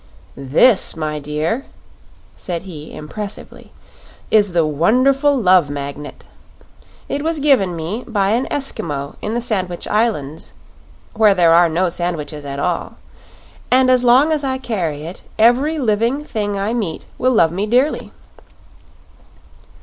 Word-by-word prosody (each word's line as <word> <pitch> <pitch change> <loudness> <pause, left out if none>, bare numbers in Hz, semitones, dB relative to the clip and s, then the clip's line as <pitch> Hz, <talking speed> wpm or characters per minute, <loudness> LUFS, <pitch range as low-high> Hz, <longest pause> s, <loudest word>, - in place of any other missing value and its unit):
"This, 150 - +3
my 155 -1 -3
dear," 150 - -2 0.7
said 175 -2 -5
he, 155 -5 -9
impressively, 200 +7 -8 0.6
"is 205 -4 +3
the 170 -2 +3
wonderful 255 - +2
Love 185 - +4
Magnet. 145 +1 -7 0.8
It 285 - -3
was 325 +1 -1
given 255 -12 +3
me 170 +9 -4
by 200 -4 0
an 240 +4 0
Eskimo 145 - -3
in 215 +2 -3
the 240 - -1
Sandwich 185 -7 -3
Islands 205 -9 -2 0.6
where 215 -3 +4
there 170 -2 +4
are 170 0 +5
no 175 +2 0
sandwiches 155 -4 -4
at 140 0 -5
all 170 +4 -2 0.7
and 255 0 +4
as 250 -1 +3
long 255 +6 +5
as 305 -2 0
I 260 -1 -1
carry 180 - -3
it 170 +4 -8 0.2
every 255 +8 +3
living 235 +2 0
thing 205 -6 -3
I 200 +3 -1
meet 200 -10 -3
will 255 +1 +2
love 165 -8 +4
me 195 +5 -2
dearly." 255 +7 +1
200 Hz, 135 wpm, -18 LUFS, 160-245 Hz, 0.8 s, are